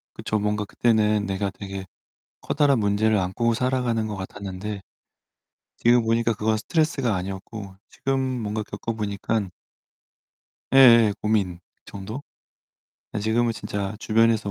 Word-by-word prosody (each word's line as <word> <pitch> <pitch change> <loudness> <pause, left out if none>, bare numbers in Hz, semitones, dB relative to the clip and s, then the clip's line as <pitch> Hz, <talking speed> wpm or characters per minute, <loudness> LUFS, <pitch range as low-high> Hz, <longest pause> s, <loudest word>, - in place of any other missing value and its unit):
그쵸. 110 - -2
뭔가 105 0 -1
그때는 105 -2 +2
내가 100 +1 -1
되게 95 -1 -7 0.6
커다란 140 -4 +2
문제를 105 +1 +2
안고 110 +5 0
살아가는 125 -3 0
것 105 - -4
같았는데 100 +1 -6 1.0
지금 120 0 +4
보니까 115 +1 +2
그건 110 +1 0
스트레스가 135 - 0
아니었고 95 +2 -6
지금 135 0 -1 0.2
뭔가 105 +1 -2
겪어 105 +3 -5
보니깐 105 -1 -2 1.2
예예. 115 -5 +8
고민 100 -5 0 0.3
정도? 105 +7 -7 0.9
예 - - 0
지금은 115 +2 +1
진짜 100 -1 -4
주변에서 110 -1 +2
110 Hz, 285 characters per minute, -24 LUFS, 100-115 Hz, 1.2 s, 예예